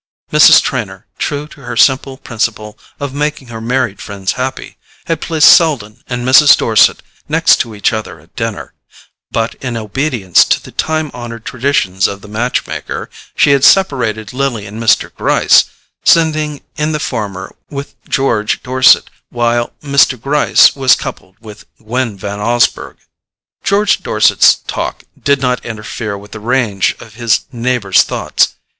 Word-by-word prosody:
Mrs. - - +7
Trenor, - - -4
true 145 0 -3
to 145 - -16
her 120 -2 -6
simple 135 +1 +2
principle 110 -4 -4 0.2
of 140 -2 -5
making 145 -3 -3
her 115 -1 -8
married 120 -3 -2
friends 100 -2 -4
happy, 130 +1 -5 0.3
had 165 -2 -2
placed 160 -2 +6
Selden 125 -9 -1
and 125 -1 -4
Mrs. 145 +2 +7
Dorset - - +3 0.3
next - - +4
to 115 -2 -4
each 100 - 0
other 110 -1 -5
at - - -24
dinner; - - -5 0.6
but, 115 0 -2
in 125 -2 -3
obedience 110 - +1
to - - +1
the - - -14
time 155 -2 -2
honoured 115 -2 -8
traditions 115 -8 0
of 100 0 -7
the - - -13
match 115 +4 -2
maker, - - -6 0.2
she - - +3
had 140 -1 +2
separated 125 - +2
Lily 125 -6 -2
and 105 +3 -8
Mr. 115 - +2
Gryce, - - +3 0.4
sending 155 -3 +2 0.2
in 155 0 -1
the 150 - -2
former 105 -9 -5
with 140 -1 -7 0.2
George 115 -6 0
Dorset, 130 0 +4 0.2
while 120 0 -1
Mr. 140 -3 +2
Gryce 145 +5 +3
was 130 -3 +4
coupled 95 - -8
with 110 -2 -13
Gwen 115 -1 -3
Van 100 +1 -6
Osburgh. 120 +3 0 0.7
George 200 +1 +1
Dorset's - - +4
talk - - -4 0.2
did 140 -1 +2
not 125 -1 -1
interfere 105 -1 -6
with 100 +1 -14
the 110 - -8
range 110 -4 0
of 110 -2 -13
his 115 -1 +1
neighbour's 120 -5 +1
thoughts. - - 0
120 Hz, 150 wpm, -14 LUFS, 110-140 Hz, 0.7 s, Mrs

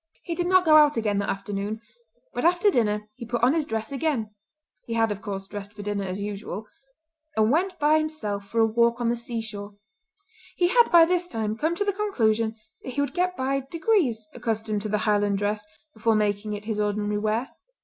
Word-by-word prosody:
He 340 - -3
did 350 +1 -1
not 370 0 +4
go 310 -1 +7
out 295 -3 +5
again 210 -3 +1
that 200 - -2
afternoon; 200 +2 -3 0.5
but - - -3
after 355 +4 +4
dinner 210 - 0
he 235 -3 -8
put 240 0 -2
on 255 +3 +5
his 315 -3 0
dress 220 +3 -3
again—he 260 -2 -5
had, 225 -1 +2
of 205 0 -4
course 195 -2 -5
dressed 205 +1 -8
for 205 -1 -8
dinner 205 -1 -2
as 185 +1 -4
usual—and 225 - -4
went 360 +4 +1
by 305 0 +4
himself 215 -11 -3
for 230 +3 +1
a - - +6
walk 235 +2 +2
on 240 -1 +1
the 240 - +1
sea 235 -1 -4
shore. 205 -2 -7 0.8
He 350 -1 +2
had 475 +3 +5
by 335 -1 +8
this 355 +1 0
time 220 -7 -2
come 315 +8 0
to 410 - -1
the 405 - +1
conclusion 230 - +1 0.3
that 255 - -7
he 285 - 0
would 285 - -2
get 365 0 0
by 270 +1 0
degrees 320 - +1
accustomed 220 -2 -2
to 215 - -4
the 210 - +1
Highland 205 -1 +2
dress 210 +1 -2 0.3
before 220 -1 +1
making 210 0 0
it 205 0 -6
his 215 -1 -2
ordinary 210 0 0
wear. 220 +5 -1
225 Hz, 205 wpm, -25 LUFS, 210-310 Hz, 0.8 s, by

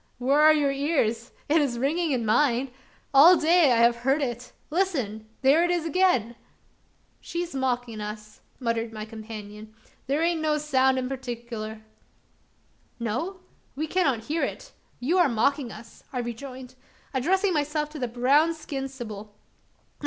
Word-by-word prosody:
where 270 +4 +2
are 310 +1 +8
your 295 -2 +2
ears? 270 -5 0 0.2
It 305 - +3
is 255 -5 -1
ringing 315 +7 0
in 245 -4 0
mine. 250 +3 +2 0.4
All 325 +7 +8
day 320 -2 +4
I 240 - +4
have 235 +1 +4
heard 270 +5 +1
it. 240 -1 -5 0.2
Listen! 260 - -1
there 285 +6 +5
it 350 - +1
is 350 -2 0
again!" 325 - +2 0.8
"She's 345 0 -5
a 270 - -3
mockin' 245 -4 -2
us," 210 0 -8 0.2
muttered 230 -2 -1
my 215 -1 -6
companion; 215 -1 -9 0.3
"thar 285 +4 +1
ain't 335 -1 +1
no 305 -1 +1
soun' 265 -3 +2
in 255 -1 -1
partickler." 235 -4 -6 1.2
"No? 320 - -3 0.3
we 305 +3 -2
cannot 290 -10 0
hear 315 +6 -2
it; - - -4 0.3
you 325 +9 +1
are 345 -5 +5
mocking 245 +2 0
us," 220 +2 -13
I 260 - -5
rejoined, 250 +2 -6 0.4
addressing 370 +9 +1
myself 300 0 -1
to 305 - -8
the 250 - -1
brown 275 +8 +3
skinned, 275 -3 -5
sibyl. 215 -5 -9
265 Hz, 150 wpm, -26 LUFS, 235-310 Hz, 1.2 s, are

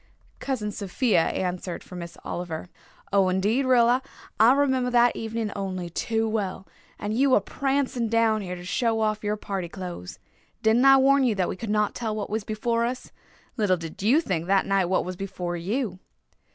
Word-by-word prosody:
Cousin 230 -6 -2
Sophia 200 -2 +1
answered 180 -1 -3
for 180 - -11
Miss 170 -1 -8
Oliver. 175 0 -5 0.4
"Oh, 195 -2 +4
indeed, 210 +8 +1
Rilla, 245 0 +4 0.4
I 230 +4 +7
remember 265 -3 +2
that 240 -1 +4
evening 225 -1 -3
only 185 -3 -4
too 225 +5 -1
well, 200 -3 -2 0.3
and 205 +1 -3
you 265 +1 +4
a - - +5
prancing 270 -3 -1
down 225 -1 +2
here 180 -2 -5
to 175 0 -10
show 225 +4 0
off 215 0 0
your 210 0 -1
party 195 -4 -4
clothes. 175 - -7 0.5
Didn't 225 +4 +4
I 270 0 +8
warn 275 +1 +4
you 240 -4 +2
that 185 -2 0
we - - -3
could 215 +3 -6
not 210 0 +1
tell 220 -3 -3
what 210 -1 -4
was 220 0 -1
before 230 +2 -1
us? 250 +2 -4 0.5
Little 200 -5 +2
did 165 0 -8
you 245 +11 +4
think 175 - -2
that 195 0 +3
night 195 -1 +2
what 185 +2 0
was 185 0 -5
before 180 -2 -4
you." 190 +3 -2
210 Hz, 185 wpm, -25 LUFS, 185-240 Hz, 0.5 s, I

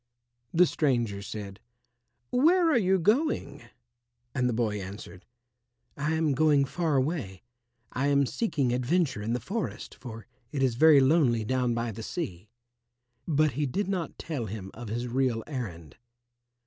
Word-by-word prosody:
The 180 +2 +5
stranger 120 - 0
said, 100 -1 -7 0.7
"Where 330 +6 +4
are 290 - +4
you 190 -2 +3
going?" 205 - 0 0.7
And 125 -2 +1
the - - +1
boy 110 -3 -1
answered, 95 -1 -9 0.7
"I 150 +3 -1
am 160 -2 +1
going 145 0 +4
far 160 +1 -1
away. 130 - -1 0.5
I 135 +2 0
am 140 -1 +3
seeking 140 - 0
adventure 130 - +1
in 110 +3 -2
the 125 - 0
forest 200 - -4
for 115 -3 -9 0.3
it 140 -3 -1
is 130 -3 +2
very 150 +3 +6
lonely 130 -6 +3
down 125 0 0
by 115 0 -2
the 110 +2 -8
sea." 105 - -5 0.8
But 155 -1 +3
he 145 +4 -1
did 195 +10 -2
not 185 -5 -3
tell 140 -9 -4
him 95 -2 -7
of 120 0 -8
his 120 +3 -3
real 125 -2 0
errand. 95 - -6
130 Hz, 150 wpm, -28 LUFS, 115-160 Hz, 0.8 s, very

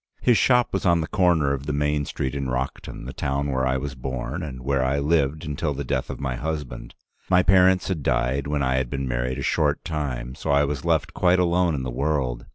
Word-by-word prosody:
His 125 - +4
shop 125 +1 +3
was 95 - -1
on 85 -2 +4
the 80 - -3
corner 85 -8 +2
of 70 0 -5
the 75 - -1
main 75 0 0
street 65 -1 -3
in 70 -1 -3
Rockton, 65 -1 -4
the 65 - -6
town 70 +1 -2
where 65 0 0
I 65 0 +1
was 70 +1 -4
born, 65 +4 -4
and 65 -6 -7
where 70 0 +1
I 65 +2 +1
lived 75 0 +1
until 75 0 -2
the 70 - -3
death 65 -1 -2
of - - -6
my 65 -2 -2
husband. 75 -2 -5 0.3
My 90 0 +5
parents 95 0 +4
had 90 -6 -2
died 65 +1 0
when 75 -1 0
I 65 0 +1
had 65 -2 -1
been 70 0 -3
married 60 +1 -1
a 70 - -4
short - - +1
time, 65 -6 -3
so - - -6
I 70 0 +4
was 70 -1 -3
left 80 -3 0
quite 90 0 +3
alone 90 -2 +2
in 65 - -3
the 65 - -3
world. 65 -3 -1
70 Hz, 235 wpm, -24 LUFS, 65-80 Hz, 0.3 s, My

